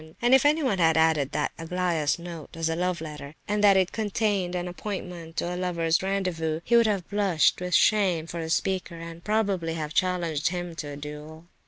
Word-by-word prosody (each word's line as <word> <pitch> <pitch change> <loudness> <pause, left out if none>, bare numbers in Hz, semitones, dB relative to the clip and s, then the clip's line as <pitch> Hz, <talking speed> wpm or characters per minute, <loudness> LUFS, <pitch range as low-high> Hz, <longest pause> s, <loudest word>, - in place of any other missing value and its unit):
And 240 +2 +3
if 265 +2 +6
anyone 290 -10 +1
had 160 -1 +4
added 160 -4 +3
that 150 - 0
Aglaya's 165 -3 0
note 170 -3 -9
was 165 0 -1
a 165 - -1
love 180 0 -1
letter, 150 -2 -8
and 210 0 0
that 200 -2 +7
it 185 -1 +2
contained 205 -4 -1
an 180 0 -2
appointment 180 -3 -6
to 175 - -1
a - - -3
lover's 170 -2 0
rendezvous, 180 -5 -1
he 235 - +2
would 235 -1 +6
have 200 -5 -1
blushed 195 -6 +2
with 180 0 0
shame 190 -7 +3
for 170 0 -5
the 160 - -5
speaker, 185 +1 -1
and, 165 0 -9
probably, 195 -6 0
have 155 -2 -4
challenged 170 -5 0
him 175 -1 -3
to 150 - -5
a 145 -1 -7
duel. 150 +2 -9
175 Hz, 200 wpm, -26 LUFS, 160-190 Hz, -, that